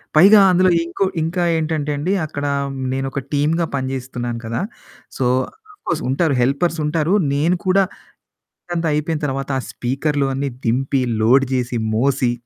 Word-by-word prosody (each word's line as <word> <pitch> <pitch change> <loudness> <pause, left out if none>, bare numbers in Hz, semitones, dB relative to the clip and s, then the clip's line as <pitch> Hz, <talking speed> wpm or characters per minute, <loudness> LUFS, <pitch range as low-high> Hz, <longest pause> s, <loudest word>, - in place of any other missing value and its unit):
పైగా 200 +6 +8
అందులో 185 +1 +4
ఇంకో 170 +3 -1 0.2
ఇంకా 175 +2 -1
ఏంటంటే 155 -2 -1
అండి. 155 +6 -1
అక్కడ 145 -1 -5 0.5
నేను 135 0 -2
ఒక 140 - -3
టీమ్‌గా 155 +4 +1
పనిచేస్తున్నాను 125 -3 -4
కదా! 115 +1 -2 0.6
సో, 130 - 0 0.5
ఆఫ్ 410 - -26
కోర్స్ 170 0 -1
ఉంటారు 140 +1 +1
హెల్పర్స్ 145 +7 +1
ఉంటారు 160 +3 +1 0.2
నేను 160 +6 +2
కూడా 190 +1 +4 0.8
అక్కడంత 175 -2 -3
అయిపోయిన 150 +1 -1
తర్వాత, 135 0 -3
ఆ - - -3
స్పీకర్లు 140 +3 -1
అన్నీ 140 +1 -2 0.2
దింపి 130 +3 +1 0.2
లోడ్ 130 +5 +5
చేసి 125 -1 -1 0.2
మోసి. 130 0 +2
145 Hz, 145 wpm, -20 LUFS, 130-165 Hz, 0.8 s, పైగా